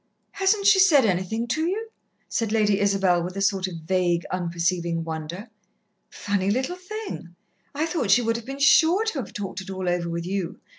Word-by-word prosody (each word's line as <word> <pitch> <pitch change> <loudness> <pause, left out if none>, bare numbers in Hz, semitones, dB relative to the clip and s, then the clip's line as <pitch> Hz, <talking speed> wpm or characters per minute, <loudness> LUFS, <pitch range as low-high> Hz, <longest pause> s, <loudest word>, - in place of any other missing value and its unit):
"Hasn't 400 +1 +1
she 410 -1 +6
said 305 - +6
anything 190 +4 -1
to 310 - 0
you?" 440 +5 -3 0.4
said 225 -2 -2
Lady 210 -2 +2
Isabel, 195 -3 +2
with 180 +2 -5
a - - -1
sort 195 -1 +1
of 170 -3 -7
vague, 175 -1 +1
unperceiving 170 -1 -1
wonder. 165 +6 -6 0.6
"Funny 200 -1 -2
little 260 - -1
thing! 365 - -7 0.4
I 305 +3 0
thought 325 - -2
she 240 +5 +5
would 230 0 0
have 235 - -8
been 270 +1 -5
sure 330 +8 +5
to 385 -10 -2
have 255 - -6
talked 195 -2 -5
it 190 - -11
all 190 -1 -4
over 175 -1 0
with 170 0 -4
you. 185 -1 -3
200 Hz, 190 wpm, -24 LUFS, 180-280 Hz, 0.6 s, she